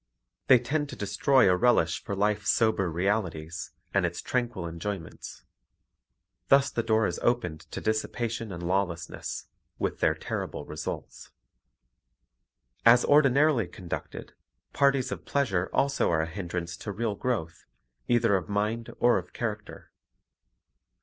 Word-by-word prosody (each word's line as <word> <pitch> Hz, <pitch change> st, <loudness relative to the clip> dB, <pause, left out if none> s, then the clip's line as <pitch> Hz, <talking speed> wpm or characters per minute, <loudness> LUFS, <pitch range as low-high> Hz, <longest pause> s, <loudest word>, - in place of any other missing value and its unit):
They 130 Hz, -, +8 dB
tend 145 Hz, +5 st, -2 dB
to -, -, -7 dB
destroy 105 Hz, +6 st, +3 dB
a 90 Hz, -, +5 dB
relish 90 Hz, -7 st, +2 dB
for 100 Hz, -, -4 dB
life's 105 Hz, +1 st, 0 dB
sober 110 Hz, -5 st, +2 dB
realities 85 Hz, -3 st, -2 dB, 0.2 s
and -, -, +3 dB
its -, -, -2 dB
tranquil 120 Hz, -8 st, -2 dB
enjoyments. 85 Hz, +1 st, -6 dB, 1.0 s
Thus 140 Hz, 0 st, +5 dB
the 115 Hz, -, 0 dB
door 110 Hz, -1 st, +2 dB
is -, -, -2 dB
opened 115 Hz, -10 st, 0 dB
to -, -, -5 dB
dissipation 110 Hz, 0 st, -2 dB
and 85 Hz, -1 st, -6 dB
lawlessness, 90 Hz, -1 st, -2 dB, 0.3 s
with -, -, -2 dB
their -, -, +3 dB
terrible -, -, -5 dB
results. 75 Hz, 0 st, -6 dB, 1.5 s
As 120 Hz, +1 st, +6 dB
ordinarily 140 Hz, -, +4 dB
conducted, 85 Hz, 0 st, -7 dB, 0.4 s
parties 140 Hz, -2 st, +2 dB
of -, -, -5 dB
pleasure 100 Hz, -11 st, 0 dB
also 140 Hz, 0 st, +1 dB
are 80 Hz, -1 st, +2 dB
a -, -, -2 dB
hindrance 85 Hz, 0 st, -5 dB
to 105 Hz, -, -5 dB
real 110 Hz, +1 st, -2 dB
growth, 100 Hz, -7 st, -3 dB, 0.4 s
either 120 Hz, -4 st, +3 dB
of 95 Hz, +2 st, -2 dB
mind 105 Hz, +3 st, -1 dB
or 120 Hz, -4 st, +4 dB
of 90 Hz, 0 st, -12 dB
character. 105 Hz, -3 st, -5 dB
105 Hz, 130 wpm, -28 LUFS, 90-120 Hz, 1.5 s, They